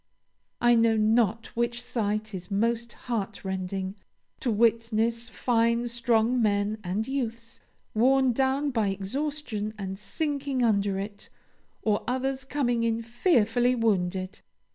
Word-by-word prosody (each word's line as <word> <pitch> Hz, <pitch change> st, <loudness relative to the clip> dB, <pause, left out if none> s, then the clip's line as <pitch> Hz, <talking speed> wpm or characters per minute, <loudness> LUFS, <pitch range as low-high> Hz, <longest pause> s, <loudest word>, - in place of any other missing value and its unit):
I 240 Hz, 0 st, +5 dB
know 230 Hz, -1 st, +4 dB
not 220 Hz, +1 st, +2 dB
which 235 Hz, 0 st, 0 dB
sight 215 Hz, -2 st, -2 dB
is 180 Hz, -1 st, -6 dB
most 230 Hz, +3 st, 0 dB
heartrending 190 Hz, -4 st, -3 dB, 0.5 s
to 250 Hz, -, -1 dB
witness 230 Hz, +1 st, +1 dB
fine 235 Hz, -1 st, +1 dB
strong 235 Hz, 0 st, +2 dB
men 205 Hz, 0 st, +1 dB
and 190 Hz, +5 st, -2 dB
youths 235 Hz, -4 st, -4 dB, 0.3 s
worn 260 Hz, +3 st, +4 dB
down 270 Hz, +3 st, +1 dB
by 225 Hz, -5 st, +1 dB
exhaustion 215 Hz, +2 st, -3 dB
and 190 Hz, -1 st, -5 dB
sinking 280 Hz, +1 st, -1 dB
under 200 Hz, -3 st, +2 dB
it, 200 Hz, +1 st, -6 dB, 0.5 s
or 210 Hz, -1 st, +1 dB
others 260 Hz, +1 st, -1 dB
coming 245 Hz, -5 st, 0 dB
in 230 Hz, 0 st, 0 dB
fearfully 240 Hz, -, +2 dB
wounded. 190 Hz, -4 st, 0 dB
230 Hz, 120 wpm, -27 LUFS, 210-245 Hz, 0.5 s, I